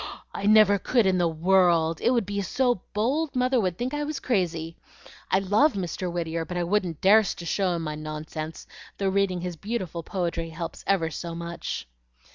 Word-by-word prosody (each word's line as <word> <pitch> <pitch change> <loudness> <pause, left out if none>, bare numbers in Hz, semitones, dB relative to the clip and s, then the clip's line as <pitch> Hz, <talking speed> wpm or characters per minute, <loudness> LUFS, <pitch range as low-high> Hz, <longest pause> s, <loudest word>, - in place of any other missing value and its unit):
"I 200 - -2
never 210 -2 +6
could 240 0 +2
in 185 -1 +2
the 175 - +3
world! 165 -1 +3
It - - +3
would 240 -4 +2
be 200 0 -2
so 245 +1 +1
bold, 270 +9 0
Mother 255 0 +2
would 180 -3 -1
think 250 +3 -3
I 295 0 -1
was 300 -1 -3
crazy. 170 -8 -1 0.5
I - - +4
love 205 +11 +3
Mr. 180 -1 -3
Whittier, 165 -1 -2
but 175 +2 -5
I 175 - 0
wouldn't 175 -3 -1
dar'st 205 +1 +5
to 170 - -7
show 185 0 0
him 165 - -3
my 155 -1 -3
nonsense, 155 +1 -6 0.3
though 195 -1 0
reading 190 -2 +1
his 180 -2 -5
beautiful 190 -4 -4
poetry 170 -2 -3
helps 165 0 -6
me - - +4
ever 165 -4 +1
so 170 +2 -5
much." 170 - -5
185 Hz, 195 wpm, -26 LUFS, 165-210 Hz, 0.5 s, never